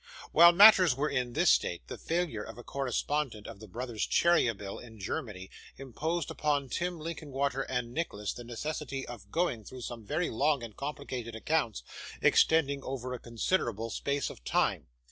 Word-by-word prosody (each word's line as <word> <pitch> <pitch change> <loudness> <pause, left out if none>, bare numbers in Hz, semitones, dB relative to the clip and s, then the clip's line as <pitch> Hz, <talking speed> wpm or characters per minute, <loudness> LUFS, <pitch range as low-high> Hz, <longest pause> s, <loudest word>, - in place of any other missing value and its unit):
While 170 +2 +9
matters 185 -5 +8
were 150 +3 -1
in 125 -3 -1
this - - +4
state, 85 -9 0
the - - -6
failure 165 -10 -2
of 110 +1 -9
a 120 - -9
correspondent 135 -3 -2
of - - -9
the 110 - -11
brothers 120 +2 -3
Cheeryble, 115 - +2
in 115 -2 -12
Germany, 95 -1 -5 0.3
imposed 150 +5 -3
upon 145 -3 0
Tim 175 +4 -2
Linkinwater 140 -4 -2
and 125 -2 -2
Nicholas 105 - -3
the 120 - -9
necessity 135 +3 -4
of 120 -2 -10
going 165 -10 0
through 130 +4 -10
some 120 -1 -6
very 155 - -1
long 140 +2 +1
and 115 -3 -8
complicated 130 -5 -5
accounts, 115 - -1 0.4
extending 140 -4 +4
over 130 -1 -4
a 125 - -5
considerable 115 - -1
space 140 -1 -1
of - - -14
time. - - +1
130 Hz, 165 wpm, -30 LUFS, 115-150 Hz, 0.4 s, While